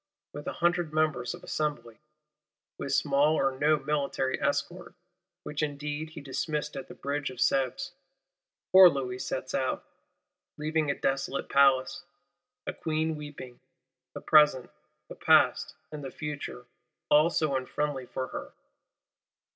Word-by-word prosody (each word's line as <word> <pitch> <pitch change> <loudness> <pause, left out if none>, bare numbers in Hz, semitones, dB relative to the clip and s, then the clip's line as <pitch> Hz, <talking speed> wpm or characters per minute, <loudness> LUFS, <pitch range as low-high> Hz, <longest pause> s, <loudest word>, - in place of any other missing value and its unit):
With 145 0 -8
a - - -2
Hundred 175 -2 +1
Members 155 -5 0
of - - -15
Assembly; 145 -7 -3 0.8
with 140 - -4
small 145 +2 +3
or 135 -3 +2
no 155 +1 +4
military 140 -2 -1
escort, 175 +5 -2 0.5
which 150 0 -4
indeed 150 +1 -3
he 155 - -9
dismissed 150 +2 -3
at 135 - -6
the - - -11
Bridge 145 +1 -3
of 130 - -10
Sèvres, 130 0 0 0.8
poor 185 -1 +10
Louis 130 -4 -3
sets - - -4
out; - - -1 0.7
leaving 155 0 0
a 140 - +1
desolate 135 0 -1
Palace; 140 +5 +3 0.6
a - - -3
Queen 160 0 -1
weeping, 145 -4 -9 0.6
the - - -6
Present, 150 -5 +4 0.4
the - - -8
Past, - - +3 0.2
and 150 -1 -7
the 135 - -5
Future 145 -4 -6 0.5
all 150 +3 +6
so 155 -5 0
unfriendly 130 0 -2
for 130 - -3
her. - - -7
145 Hz, 135 wpm, -29 LUFS, 135-155 Hz, 0.8 s, poor